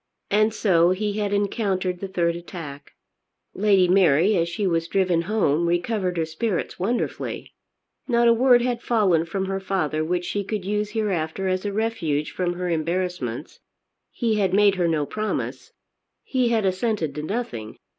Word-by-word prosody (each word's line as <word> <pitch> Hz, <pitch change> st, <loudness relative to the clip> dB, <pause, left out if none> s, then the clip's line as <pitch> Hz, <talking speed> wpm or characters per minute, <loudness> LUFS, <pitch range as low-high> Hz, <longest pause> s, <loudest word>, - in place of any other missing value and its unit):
And 215 Hz, +2 st, +3 dB
so 175 Hz, -6 st, +3 dB
he 205 Hz, +3 st, -1 dB
had 205 Hz, -1 st, -1 dB
encountered 195 Hz, -3 st, -1 dB
the 195 Hz, -, -4 dB
third 170 Hz, -3 st, 0 dB
attack. 165 Hz, -5 st, -9 dB, 0.6 s
Lady 195 Hz, -2 st, +3 dB
Mary, 180 Hz, +1 st, +4 dB
as 170 Hz, -1 st, +1 dB
she 195 Hz, +4 st, -2 dB
was 165 Hz, -2 st, 0 dB
driven 180 Hz, -2 st, +1 dB
home, 170 Hz, -6 st, +2 dB
recovered 180 Hz, +1 st, -1 dB
her 165 Hz, -, +1 dB
spirits 175 Hz, +5 st, -3 dB
wonderfully. 230 Hz, +7 st, -3 dB, 0.5 s
Not 235 Hz, -2 st, +3 dB
a 235 Hz, -, +7 dB
word 245 Hz, 0 st, +5 dB
had 245 Hz, -1 st, -1 dB
fallen 190 Hz, -8 st, +2 dB
from 190 Hz, +3 st, -3 dB
her 195 Hz, 0 st, -2 dB
father 155 Hz, -6 st, -1 dB
which 175 Hz, +2 st, -1 dB
she 205 Hz, +2 st, -2 dB
could 200 Hz, -1 st, -4 dB
use 210 Hz, +1 st, -1 dB
hereafter 190 Hz, -4 st, -1 dB
as 185 Hz, +1 st, -1 dB
a 205 Hz, -, -1 dB
refuge 195 Hz, -9 st, -1 dB
from 180 Hz, -1 st, -1 dB
her 180 Hz, +1 st, -4 dB
embarrassments. 165 Hz, -6 st, -2 dB, 0.5 s
He 225 Hz, -3 st, -1 dB
had 190 Hz, -2 st, +1 dB
made 205 Hz, -1 st, +5 dB
her 180 Hz, -3 st, 0 dB
no 155 Hz, -3 st, +1 dB
promise. 215 Hz, +7 st, -4 dB, 0.5 s
He 255 Hz, -3 st, +1 dB
had 225 Hz, -3 st, +1 dB
assented 185 Hz, -, 0 dB
to 150 Hz, -, -4 dB
nothing. 150 Hz, -, -4 dB
185 Hz, 165 wpm, -24 LUFS, 170-210 Hz, 0.6 s, a